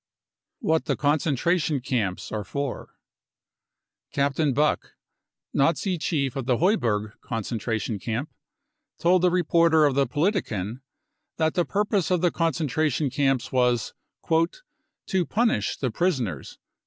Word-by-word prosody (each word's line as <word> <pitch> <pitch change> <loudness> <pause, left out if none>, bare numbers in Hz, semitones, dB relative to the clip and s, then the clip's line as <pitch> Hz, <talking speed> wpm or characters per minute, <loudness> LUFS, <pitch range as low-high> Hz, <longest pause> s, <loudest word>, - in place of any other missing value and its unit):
What 160 -8 +1
the. - - 0
concentration 150 +1 +1
camps 115 -8 -2
are 110 -1 -3
for. 140 +4 -5 1.2
Captain 140 +1 +1
Buck, 150 +4 0 0.6
Nazi 170 +5 +1
chief 140 -6 -1
of 135 -3 -4
the 125 -3 +3
Heuberg 115 - +1
concentration 115 -2 -3
camp, 120 +8 -4 0.6
told 180 +1 +3
the 180 - +4
reporter 170 -2 +4
of 145 - +2
the 140 +1 +2
Politiken 130 - -1 0.6
that 160 0 +1
the 175 -2 +1
purpose 205 -2 0
of 180 -2 +2
the 175 -2 +3
concentra 155 -2 0
tion 135 +1 -1
camps 135 -3 0
was 125 -3 +1 0.2
" - - -38 0.9
to 190 -2 +2
punish 220 - +1
the 130 -4 -2
prisoners. 125 - -2
145 Hz, 125 wpm, -25 LUFS, 120-170 Hz, 1.2 s, the